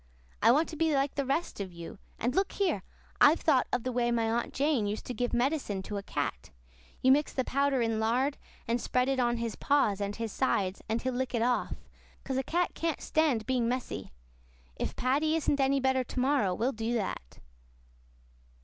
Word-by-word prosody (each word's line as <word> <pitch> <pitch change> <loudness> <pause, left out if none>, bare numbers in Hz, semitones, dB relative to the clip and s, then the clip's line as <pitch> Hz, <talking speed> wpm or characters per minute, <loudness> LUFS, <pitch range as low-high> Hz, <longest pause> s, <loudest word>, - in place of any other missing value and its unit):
I 225 - +6
want 305 +6 +3
to 320 - -7
be 315 -1 +2
like 275 +1 +1
the 280 -2 -2
rest 300 +1 -1
of 195 -2 -4
you. 170 +2 -9 0.2
And 245 +3 -1
look 385 +4 +1
here! 350 - 0 0.4
I've 305 +3 +7
thought 270 -5 +3
of 240 - 0
the 255 - -2
way 240 -1 +1
my 230 -1 +1
Aunt 235 +1 -1
Jane 275 -6 +1
used 210 +1 -4
to 250 - -4
give 245 +1 -1
medicine 240 -6 0
to 205 +1 -5
a - - -3
cat. 60 - -3 0.5
You 260 - +6
mix 290 +2 +3
the 260 - 0
powder 275 -1 +1
in 225 -1 0
lard, 250 +6 +1 0.3
and 235 +1 0
spread 250 0 +1
it 270 -1 0
on 240 -1 +2
his 230 -1 -3
paws 270 -9 +2
and 200 0 -2
his 230 -2 -4
sides 195 -7 0
and 225 +1 -1
he'll 260 0 -1
lick 255 0 -2
it 230 - +1
off, 245 0 0 0.5
'cause 265 -1 -2
a - - +2
cat 345 +6 0
can't 330 -1 -2
stand 290 -9 +1
being 245 -2 +1
messy. 245 - -4 0.6
If - - -4
Paddy 290 +5 +1
isn't 290 -3 +1
any 275 0 +3
better 265 -1 +2
to 250 - -5
morrow, 255 -8 +2
we'll 245 +7 0
do 225 0 -2
that." 190 - -4
250 Hz, 205 wpm, -30 LUFS, 225-280 Hz, 0.6 s, I've